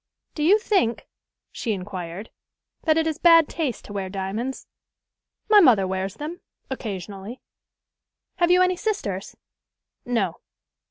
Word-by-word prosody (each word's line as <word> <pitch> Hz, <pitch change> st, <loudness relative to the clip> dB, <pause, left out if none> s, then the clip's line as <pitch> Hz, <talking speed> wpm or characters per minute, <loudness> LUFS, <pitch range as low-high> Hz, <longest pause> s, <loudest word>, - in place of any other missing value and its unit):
"Do 300 Hz, -, -5 dB
you 365 Hz, +8 st, +6 dB
think," 390 Hz, -, 0 dB, 0.5 s
she 225 Hz, -, -2 dB
inquired, 185 Hz, 0 st, -6 dB, 0.5 s
"that 315 Hz, -1 st, +4 dB
it 320 Hz, -, +2 dB
is 315 Hz, -1 st, -2 dB
bad 330 Hz, -3 st, +7 dB
taste 300 Hz, -8 st, -3 dB
to 205 Hz, -, -9 dB
wear 195 Hz, -2 st, -3 dB
diamonds?" 200 Hz, +7 st, -4 dB, 0.8 s
"My 425 Hz, -1 st, +7 dB
mother 240 Hz, -, +6 dB
wears 190 Hz, +1 st, -3 dB
them 310 Hz, +7 st, -6 dB, 0.3 s
occasionally." 205 Hz, -1 st, -6 dB, 1.0 s
"Have 345 Hz, -1 st, +3 dB
you 360 Hz, +1 st, +6 dB
any 365 Hz, 0 st, +1 dB
sisters?" 215 Hz, -, -3 dB, 0.7 s
"No." 225 Hz, -8 st, -1 dB
240 Hz, 125 wpm, -24 LUFS, -, 1.0 s, bad